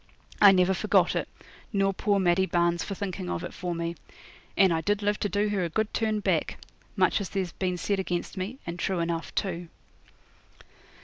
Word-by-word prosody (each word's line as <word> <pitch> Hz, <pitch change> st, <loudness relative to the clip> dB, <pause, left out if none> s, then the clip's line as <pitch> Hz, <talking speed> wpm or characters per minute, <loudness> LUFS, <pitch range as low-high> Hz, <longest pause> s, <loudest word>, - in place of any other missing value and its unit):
I 200 Hz, -, +10 dB
never 185 Hz, 0 st, +4 dB
forgot 190 Hz, -, +2 dB
it, -, -, -2 dB, 0.4 s
nor 195 Hz, -2 st, +2 dB
poor 205 Hz, +1 st, +1 dB
Maddie 190 Hz, +1 st, +3 dB
Barnes 170 Hz, -1 st, +1 dB
for 195 Hz, -, -5 dB
thinking 185 Hz, -2 st, -4 dB
of 170 Hz, -, -3 dB
it -, -, -6 dB
for 180 Hz, -1 st, -4 dB
me. 170 Hz, 0 st, -3 dB, 0.6 s
And 190 Hz, -3 st, +5 dB
I 160 Hz, -, 0 dB
did 205 Hz, +3 st, 0 dB
live 205 Hz, +1 st, +1 dB
to 205 Hz, -, -1 dB
do 205 Hz, +1 st, +1 dB
her 200 Hz, -3 st, 0 dB
a 170 Hz, -, -1 dB
good 215 Hz, +6 st, -1 dB
turn 215 Hz, -2 st, 0 dB
back -, -, 0 dB, 0.4 s
much -, -, +2 dB
as 195 Hz, -, -4 dB
there's 190 Hz, -3 st, -2 dB
been 180 Hz, -1 st, -2 dB
said 200 Hz, +2 st, -1 dB
again 175 Hz, -2 st, -1 dB
me, 195 Hz, +7 st, -4 dB
and 170 Hz, +1 st, -5 dB
true 190 Hz, +1 st, 0 dB
enough, 170 Hz, -1 st, -2 dB
too. 175 Hz, -3 st, -2 dB
190 Hz, 195 wpm, -27 LUFS, 175-205 Hz, 0.6 s, I